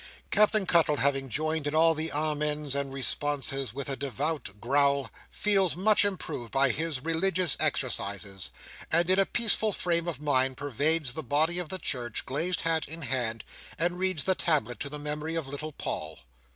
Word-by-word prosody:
Captain 210 -1 +3
Cuttle, 165 -4 +3
having 135 -1 0
joined 155 +4 -1
in 145 - -2
all 165 +1 +5
the 160 +1 -2
amens 150 -1 -1
and 140 -1 -2
responses, 135 -1 0
with 135 +3 -5
a 135 - 0
devout 140 -4 -3
growl, 140 +3 +2 0.2
feels 195 -5 +2
much 210 +4 +4
improved 175 - -3
by 135 +1 +3
his 155 0 -2
religious 165 +1 +1
exercises; 100 -1 -1 0.4
and 170 +2 +3
in 190 - +4
a 195 - +4
peaceful 220 -2 +3
frame 170 -3 0
of 170 - -3
mind 130 -3 +1
pervades 145 0 0
the 160 - -4
body 155 +6 +1
of 175 -4 -4
the 190 - -2
church, 120 - -3
glazed 165 +7 0
hat 165 -1 0
in 165 +2 -6
hand, 120 -4 -2 0.3
and 175 +2 -1
reads 185 -5 +1
the 190 - +2
tablet 140 - 0
to 140 - -3
the 150 - -5
memory 150 +2 -4
of 165 -4 -2
little 145 +3 -5
Paul. - - -5
150 Hz, 175 wpm, -28 LUFS, 135-165 Hz, 0.4 s, all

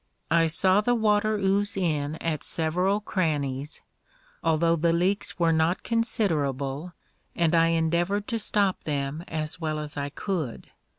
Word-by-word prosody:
I 165 0 +4
saw 185 +5 +3
the 245 +3 +2
water 215 -1 +2
ooze 200 +1 0
in 155 -5 0
at 160 -2 -2
several 180 +6 0
crannies, 150 -8 -2 0.6
although 165 +1 +3
the 170 +1 +2
leaks 185 +4 0
were 165 -2 +3
not 160 +3 +1
considerable, 160 - -1 0.4
and 170 -1 +2
I 165 0 +5
endeavored 170 +5 +1
to 230 -2 -1
stop 200 -2 0
them 145 +1 -2
as 155 +1 -4
well 155 -1 -1
as 150 -1 -6
I 140 0 -2
could. 155 - -4
165 Hz, 140 wpm, -26 LUFS, 155-195 Hz, 0.6 s, I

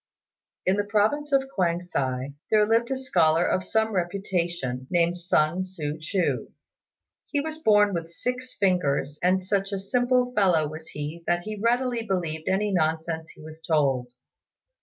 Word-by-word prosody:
In 185 +2 +2
the 205 - +1
province 220 +9 +1
of 270 -1 +3
Kuang 175 -3 +1
si 135 -6 -3 0.2
there 215 -1 +5
lived 230 +2 +2
a 265 - 0
scholar 175 -11 +2
of 185 - +1
some 220 +2 +1
reputation, 175 -8 -2
named 175 0 +2
Sun 175 -1 +1
Tzŭ 160 -5 -4
ch'u. 180 +3 -1 0.8
He 290 - -1
was 315 +2 -4
born 210 -7 +4
with 165 -1 -3
six 250 +8 -4
fingers, 150 -7 +1
and 185 +1 +2
such 195 +1 -1
a 200 - -1
simple 250 +5 +1
fellow 180 -8 +3
was 155 +2 -9
he 150 +3 -6
that 175 0 +1
he 215 +2 -5
readily 240 +3 +1
believed 170 -7 -3
any 205 +2 +1
nonsense 160 -1 -1
he 155 - -14
was 155 +1 -11
told. 135 -7 +1
185 Hz, 160 wpm, -26 LUFS, 160-215 Hz, 0.8 s, there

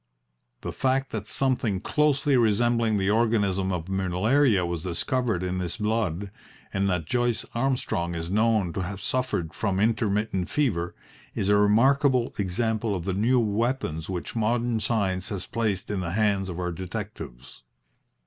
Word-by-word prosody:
The - - -4
fact 135 0 0
that 110 -2 -4
something 125 -7 0
closely 145 +4 +2
resembling 115 -1 +2
the 95 0 +1
organism 105 -4 +2
of 85 -2 -3
malaria 95 +4 +2
was 85 -2 -3
discovered 100 - -1
in 90 0 -2
this 90 0 -3
blood, 105 -4 -1 0.4
and 100 0 +1
that 90 -4 -1
Joyce 120 +4 0
Armstrong 115 -9 -1
is 85 +1 -4
known 105 -4 +2
to 95 - -2
have 95 +1 -4
suffered 125 -7 -1
from 100 -3 -1
intermittent 105 -3 0
fever, 100 - 0 0.4
is 95 - -1
a 105 - +5
remarkable 125 +5 +3
example 110 +2 0
of 85 -2 -4
the 95 - -1
new 115 +7 +3
weapons 110 - -1
which 90 +3 -4
modern 115 +1 +1
science 100 -4 0
has 100 -3 -4
placed 105 -4 -2
in 100 - -1
the 85 -2 -3
hands 100 -2 +1
of 85 - -5
our 90 -1 -2
detectives. 85 - -7
105 Hz, 150 wpm, -26 LUFS, 90-115 Hz, 0.4 s, a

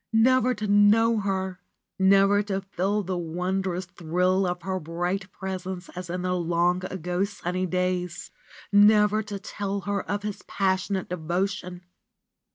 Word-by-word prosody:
Never 255 +2 +4
to 210 - -4
know 210 +3 +4
her! 190 -2 -2 0.4
Never 195 +1 +5
to 195 -2 -2
feel 195 +2 -1
the 185 -1 -2
wondrous 180 +2 -2
thrill 180 +2 0
of 180 -1 -3
her 190 0 -2
bright 175 +4 -3
presence 190 -1 -5
as 180 -1 -8
in 180 +1 -3
the 180 0 0
long 175 +1 +1
ago 180 0 -2
sunny 185 -2 -2
days! 180 -1 -2 0.4
Never 210 +1 +6
to 205 -1 -6
tell 200 0 -4
her 200 0 -1
of 205 +1 -2
his 210 -1 -4
passionate 190 0 0
devotion 180 +1 -3
190 Hz, 140 wpm, -26 LUFS, 180-200 Hz, 0.4 s, Never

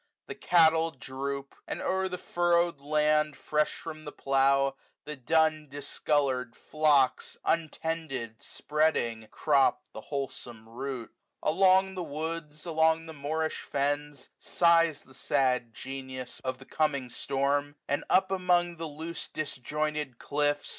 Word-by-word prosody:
The - - -6
cattle 165 -1 +4
droop 140 -1 -5
j - - -24
and - - -4
o'er 190 0 0
the 180 -1 -4
furrowed 175 -3 +1
land 150 0 +2
Fresh 150 0 0
from 155 -1 -8
the 150 - -7
plough^ 135 0 +2 0.3
the 150 0 -5
dun 155 +3 +2
discoloarM 140 -3 -1
floob^ 150 -4 +2
Untended 155 -8 -2
spreading, 135 -8 0
crop 140 +1 +2
the - - -7
wholesome 125 -5 -6
root* 125 +1 -5 0.3
65 155 - +2
Along 190 +1 +4
the 185 - -4
woods, 155 0 -5
along 160 0 +2
the 160 - -8
moorish 155 +2 -2
fens^ 145 0 -2
Sighs 165 -3 +3
the 130 - -18
sad 130 -3 +1
Gemus 130 0 -7
of 130 -1 -2
the 135 - -14
coming 140 -4 0
storm 140 +3 0
) - - -55
And 145 - 0
up 190 +1 +4
among 175 -2 +2
the 165 0 -4
loose 160 +3 -6
disjointed 150 -1 -3
cllflfb. 145 +1 0
150 Hz, 135 wpm, -29 LUFS, 135-160 Hz, 0.3 s, cattle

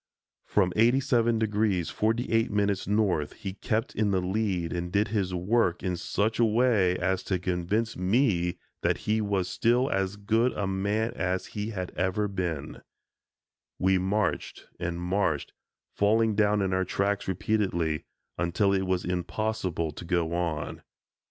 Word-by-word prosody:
From 95 -3 +2
87° 115 0 +3 0.5
48´ 110 -3 +1
north, 100 -8 +1
he 95 -1 -6
kept 110 +3 -2
in 105 -1 +1
the 95 -2 +2
lead 95 -2 -1
and 90 0 -3
did 100 +2 +2
his 100 -4 0
work 90 -1 +1
in 90 -1 0
such 105 +6 -1
a - - +5
way 110 -5 +3
as 95 +1 0
to 95 - 0
convince 90 +5 -1
me 90 -3 +1 0.2
that - - 0
he 110 +1 +2
was 100 -3 0
still 120 +7 +2
as 95 0 0
good 110 +4 +1
a 100 - -2
man 100 +4 0
as 90 0 -1
he 105 +1 -3
had 95 -5 -4
ever 100 +3 0
been. 85 -7 -4 1.0
We 95 0 +3
marched 100 +3 -1
and 85 0 -3
marched, 90 -4 -1 0.4
falling 110 +2 +3
down 105 -1 +2
in 95 -1 0
our 95 0 +2
tracks 100 +2 -1
repeatedly, 95 -5 0 0.3
until 95 +3 +2
it 95 -1 0
was 90 -1 0
impossible 90 -1 -2
to 75 - -9
go 85 -1 0
on. 85 -4 -2
95 Hz, 145 wpm, -28 LUFS, 90-110 Hz, 1.0 s, a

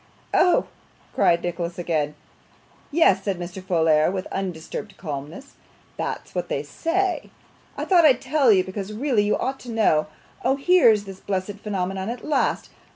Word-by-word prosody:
'Oh!' 360 - +4 0.5
cried 170 0 +3
Nicholas 175 0 -3
again. 155 -4 -1 0.7
'Yes,' 285 - +4
said 195 -3 -1
Mr. 175 +2 -7
Folair, 160 -4 +3
with 190 -1 -3
undisturbed 190 +2 -5
calmness, 155 - -7 0.4
'that's - - -5
what - - -3
they - - -1
say. 365 +2 -1 0.5
I - - -2
thought 355 -3 +5
I'd 255 -4 +4
tell 270 -2 +3
you, 190 -3 +4
because 195 +2 -6
really 240 -2 +1
you 205 - +1
ought 270 +1 -3
to 245 - -11
know. 205 -9 +2 0.4
Oh! 260 +2 +3
here's 275 - +4
this 195 -1 -10
blessed 195 +1 -3
phenomenon 190 -1 -3
at 235 0 -6
last. 305 -2 0
195 Hz, 155 wpm, -23 LUFS, 175-260 Hz, 0.7 s, thought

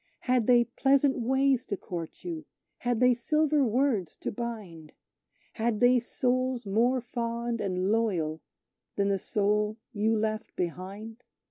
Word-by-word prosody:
Had 250 -3 +1
they 240 -1 +6
pleasant 270 +3 +2
ways 265 +1 +2
to 200 - -2
court 170 -3 -7
you 335 -3 -5 0.3
had 245 -2 0
they 250 0 +5
silver 300 +4 +2
words 230 - +1
to - - -2
bind? 205 -9 -6 0.6
Had 225 -1 -1
they 245 0 +5
souls 255 0 -1
more 235 +6 +2
fond 235 -1 -3
and 185 0 0
loyal 175 -9 0 0.5
than 200 0 +1
the 195 -1 +1
soul 210 +2 0 0.2
you 220 +1 +1
left 215 0 -2
behind? 195 +7 -5
230 Hz, 135 wpm, -28 LUFS, 205-250 Hz, 0.6 s, they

